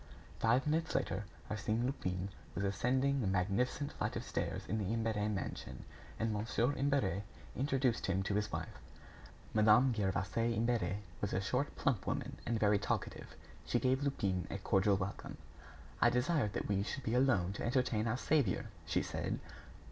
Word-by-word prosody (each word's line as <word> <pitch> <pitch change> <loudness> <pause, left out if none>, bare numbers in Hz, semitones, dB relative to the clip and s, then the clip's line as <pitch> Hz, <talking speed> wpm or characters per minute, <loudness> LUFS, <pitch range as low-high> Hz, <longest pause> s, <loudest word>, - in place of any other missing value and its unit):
Five 120 +4 +3
minutes 160 +2 0
later, 100 +2 0 0.3
Arsène 110 +3 0
Lupin 95 -8 -2 0.3
was 95 - -1
ascending 130 +7 +1
the 105 - 0
magnificent 100 +10 0
flight - - -3
of - - -2
stairs - - -2
in 110 +3 -1
the 100 -1 -1
Imbert 115 -1 0
mansion, 100 -2 -4 0.3
and 115 -1 +1
Mon. 105 +2 -2 0.3
Imbert 135 -9 +1 0.3
introduced 130 -3 +1
him 95 0 +1
to 95 - -1
his 105 +1 0
wife. - - -5 0.7
Madame 110 +4 +6
Gervaise 105 +3 0
Imbert 115 -3 +1 0.3
was 100 - -1
a - - +2
short 125 +9 -1
plump 125 -10 0
woman, - - -2
and 115 -1 +1
very 105 -1 +4
talkative. 105 - -3 0.3
She - - +1
gave 130 +1 +2
Lupin 100 -11 0
a - - -3
cordial 95 0 +3
welcome. 95 0 -5 0.6
"I 120 - +7
desired 125 -2 +1
that - - -2
we 100 -1 +1
should 130 +6 -4
be 110 - -1
alone 120 -8 +3
to - - -5
entertain 120 -3 +1
our 115 +2 +1
saviour," 135 - +2 0.2
she - - +1
said. - - -2
110 Hz, 165 wpm, -35 LUFS, 100-130 Hz, 0.7 s, I